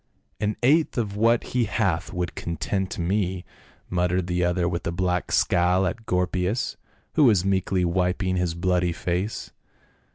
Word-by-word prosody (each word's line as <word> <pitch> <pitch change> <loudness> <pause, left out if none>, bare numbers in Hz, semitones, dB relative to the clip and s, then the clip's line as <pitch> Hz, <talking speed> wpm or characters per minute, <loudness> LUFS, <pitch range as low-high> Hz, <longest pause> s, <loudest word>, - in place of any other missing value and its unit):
"An 105 0 -1
eighth 150 +5 +3
of 105 -4 -1
what 115 +2 +3
he 125 -2 +2
hath - - -1
would 90 -1 -3
content 95 +3 -3
me," 90 +1 -1 0.4
muttered 90 0 0
the 90 0 0
other 90 0 +1
with 85 -1 -3
a - - 0
black 90 0 -1
scowl 90 +2 +3
at 110 +5 -4
Gorpius, 90 +6 0 0.4
who 150 - +5
was 100 -7 +4
meekly 95 -1 +1
wiping 90 +2 0
his 90 -2 0
bloody 90 0 +1
face. 90 +5 -3
90 Hz, 150 wpm, -25 LUFS, 90-100 Hz, 0.4 s, who